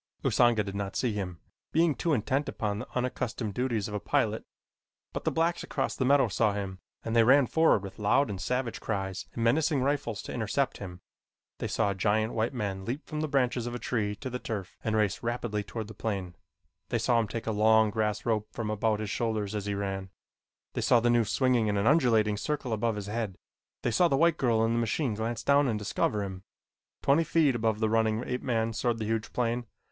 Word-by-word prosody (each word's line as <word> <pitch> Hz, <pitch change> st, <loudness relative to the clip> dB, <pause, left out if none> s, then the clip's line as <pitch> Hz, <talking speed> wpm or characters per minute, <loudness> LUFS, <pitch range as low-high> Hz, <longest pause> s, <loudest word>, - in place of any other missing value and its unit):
Usanga 120 Hz, -3 st, +4 dB
did 100 Hz, -1 st, -6 dB
not 100 Hz, 0 st, -4 dB
see 120 Hz, -4 st, 0 dB
him, 95 Hz, -4 st, -4 dB, 0.3 s
being 165 Hz, 0 st, +3 dB
too 165 Hz, -, -1 dB
intent 135 Hz, +2 st, 0 dB
upon 105 Hz, -1 st, -2 dB
the -, -, -6 dB
unaccustomed 125 Hz, -3 st, -2 dB
duties 120 Hz, -4 st, -1 dB
of 105 Hz, -, -7 dB
a 105 Hz, -, -1 dB
pilot, -, -, 0 dB, 0.7 s
but -, -, -5 dB
the -, -, +2 dB
blacks 165 Hz, +1 st, +1 dB
across -, -, -2 dB
the 130 Hz, -, 0 dB
meadow 135 Hz, -1 st, +5 dB
saw 105 Hz, 0 st, +1 dB
him 95 Hz, -2 st, -4 dB, 0.3 s
and 115 Hz, -, -2 dB
they 115 Hz, -, +6 dB
ran 135 Hz, +4 st, +6 dB
forward 160 Hz, -9 st, +3 dB
with 95 Hz, 0 st, -9 dB
loud 135 Hz, +7 st, +3 dB
and 100 Hz, -3 st, -5 dB
savage 125 Hz, +3 st, -2 dB
cries 95 Hz, -3 st, -3 dB
and 115 Hz, -, -2 dB
menacing 145 Hz, +5 st, +3 dB
rifles 135 Hz, -8 st, -1 dB
to -, -, -6 dB
intercept -, -, -1 dB
him. 90 Hz, -2 st, -8 dB, 0.6 s
They -, -, -2 dB
saw 100 Hz, -, +1 dB
a -, -, -1 dB
giant 110 Hz, +3 st, +1 dB
white 110 Hz, +1 st, 0 dB
man 100 Hz, -6 st, -3 dB
leap 125 Hz, -, -4 dB
from 155 Hz, -2 st, -4 dB
the 155 Hz, -, 0 dB
branches 125 Hz, -4 st, +1 dB
of 120 Hz, -, -4 dB
a -, -, -1 dB
tree 105 Hz, -4 st, -1 dB
to 130 Hz, +5 st, -6 dB
the 125 Hz, -, -3 dB
turf 100 Hz, -7 st, -5 dB
and 110 Hz, -1 st, 0 dB
race 105 Hz, -2 st, +1 dB
rapidly 115 Hz, -3 st, -2 dB
toward 110 Hz, +1 st, -6 dB
the 110 Hz, -, -9 dB
plane. 95 Hz, -5 st, -3 dB, 0.5 s
They -, -, +1 dB
saw 120 Hz, -1 st, +2 dB
him 115 Hz, -, 0 dB
take 115 Hz, +2 st, -5 dB
a 110 Hz, -, 0 dB
long 110 Hz, 0 st, +4 dB
grass 105 Hz, -1 st, -1 dB
rope 110 Hz, -2 st, 0 dB
from 110 Hz, -2 st, -3 dB
about 110 Hz, 0 st, 0 dB
his 105 Hz, -2 st, -3 dB
shoulders 110 Hz, -3 st, -1 dB
as 105 Hz, -1 st, -3 dB
he 100 Hz, -, -1 dB
ran. 95 Hz, -1 st, -3 dB, 0.6 s
They -, -, -2 dB
saw 120 Hz, -, +5 dB
the 120 Hz, +1 st, +2 dB
noose 115 Hz, -4 st, +2 dB
swinging 125 Hz, -4 st, +2 dB
in 105 Hz, -1 st, +1 dB
an 100 Hz, -, +1 dB
undulating 115 Hz, -8 st, +4 dB
circle 135 Hz, +1 st, -2 dB
above 110 Hz, +1 st, 0 dB
his 105 Hz, -1 st, -5 dB
head. 105 Hz, -2 st, -3 dB, 0.5 s
They 120 Hz, -, +1 dB
saw 175 Hz, +11 st, +4 dB
the 135 Hz, -, +1 dB
white 165 Hz, +2 st, +4 dB
girl 115 Hz, -3 st, +2 dB
in 115 Hz, -, +1 dB
the 115 Hz, -, +1 dB
machine 120 Hz, +2 st, 0 dB
glance 110 Hz, +2 st, -3 dB
down 140 Hz, 0 st, +4 dB
and 110 Hz, -3 st, 0 dB
discover 105 Hz, -1 st, 0 dB
him. 95 Hz, -1 st, -6 dB, 0.6 s
Twenty 145 Hz, +4 st, +4 dB
feet 160 Hz, -4 st, +3 dB
above 110 Hz, -2 st, 0 dB
the 110 Hz, -, +2 dB
running 110 Hz, +1 st, +1 dB
ape 125 Hz, 0 st, -2 dB
man 115 Hz, -3 st, 0 dB
soared 115 Hz, +1 st, 0 dB
the 110 Hz, -, -3 dB
huge 110 Hz, 0 st, -2 dB
plane. 120 Hz, 0 st, -1 dB
115 Hz, 225 wpm, -29 LUFS, 105-125 Hz, 0.7 s, they